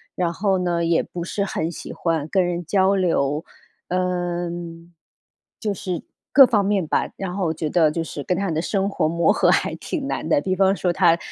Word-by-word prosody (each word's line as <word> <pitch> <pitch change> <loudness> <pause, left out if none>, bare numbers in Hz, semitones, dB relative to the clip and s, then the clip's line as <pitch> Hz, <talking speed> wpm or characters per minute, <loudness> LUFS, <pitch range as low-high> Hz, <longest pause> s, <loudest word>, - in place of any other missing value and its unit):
然 175 -2 0
后 195 +1 +1
呢， 175 -2 0
也 165 0 +2
不 175 - -6
是 200 +3 -2
很 165 -3 -2
喜 - - -8
欢 165 -3 -1
跟 190 +1 +2
人 175 0 -3
交 190 +3 +3
流。 160 -5 0 0.4
嗯， 175 -2 -3 0.7
就 210 -2 -1
是 180 -3 -4 0.3
各 275 -1 +10
方 210 -4 +2
面 195 -4 +1
吧， - - 0
然 185 -2 -4
后 195 -2 -1
我 160 - 0
觉 155 -1 -3
得， 160 -2 +3
就 165 +1 -2
是 145 -3 -6
跟 180 - 0
她 195 0 -1
的 160 - -1
生 195 +2 0
活 155 - 0
磨 170 +1 +2
合 - - +3
还 - - +1
挺 285 -5 -4
难 160 - -3
的， 160 - +3
比 185 +4 -1
方 195 +1 +3
说 180 -2 0
她 170 -2 +4
175 Hz, 225 characters per minute, -22 LUFS, 165-190 Hz, 0.7 s, 各